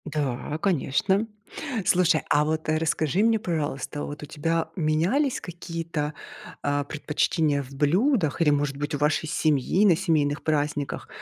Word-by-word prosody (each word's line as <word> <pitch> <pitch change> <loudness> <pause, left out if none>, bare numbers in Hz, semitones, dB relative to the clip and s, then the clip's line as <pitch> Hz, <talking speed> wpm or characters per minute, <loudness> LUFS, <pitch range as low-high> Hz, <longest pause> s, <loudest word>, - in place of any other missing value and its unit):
Да, 145 -1 -2
конечно. 190 +5 +1 0.6
Слушай, 175 -3 +3
а 150 +1 +4
вот 155 +1 -2
расскажи 160 +3 +1
мне, 225 -1 +3
пожалуйста, 150 -5 -3
вот 145 +1 -6
у - - -4
тебя 165 +2 -1
менялись 180 - +1
какие-то, 165 -3 -4 0.5
а, 145 0 +1
предпочтения 150 0 0
в 135 -1 -11
блюдах 175 - +2
или, 160 - +5
может 145 -1 0
быть, 145 +1 -2
у - - -2
вашей 150 +2 +1
семьи 155 +4 +2
на 185 -5 +6
семейных 155 -5 0
праздниках? 145 -2 -1
155 Hz, 140 wpm, -25 LUFS, 145-170 Hz, 0.6 s, на